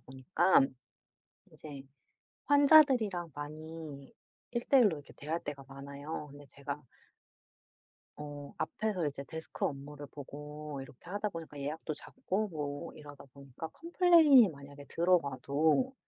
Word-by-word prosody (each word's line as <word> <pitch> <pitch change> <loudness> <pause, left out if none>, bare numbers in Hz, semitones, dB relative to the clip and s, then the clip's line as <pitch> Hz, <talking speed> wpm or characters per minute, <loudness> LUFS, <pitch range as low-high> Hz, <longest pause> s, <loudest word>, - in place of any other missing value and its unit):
보니까 135 +8 +3 0.9
이제 145 -3 -9 0.6
환자들이랑 270 - +5
많이 150 -1 -8 0.4
1:1 245 +1 +4
로 160 -7 0
이렇게 145 - -14
대화할 160 +4 -3
때가 140 -2 -6
많아요. 140 +2 -7
근데 145 0 -13
제가 140 +2 -6 1.4
어 145 -1 -7
앞에서 205 -7 -1
이제 140 -1 -3
데스크 160 0 -6
업무를 145 +1 -5
보고 150 +1 -8
이렇게 135 +4 -13
하다 205 +2 -1
보니까 165 -5 -8
예약도 155 +3 -3
잡고 215 - -2
뭐 145 -4 -5
이러다 145 -2 -12
보니까 140 +3 -9
컴플레인이 330 - +6
만약에 140 -1 -11
들어와도 160 - +2
150 Hz, 275 characters per minute, -32 LUFS, 140-185 Hz, 1.4 s, 컴플레인이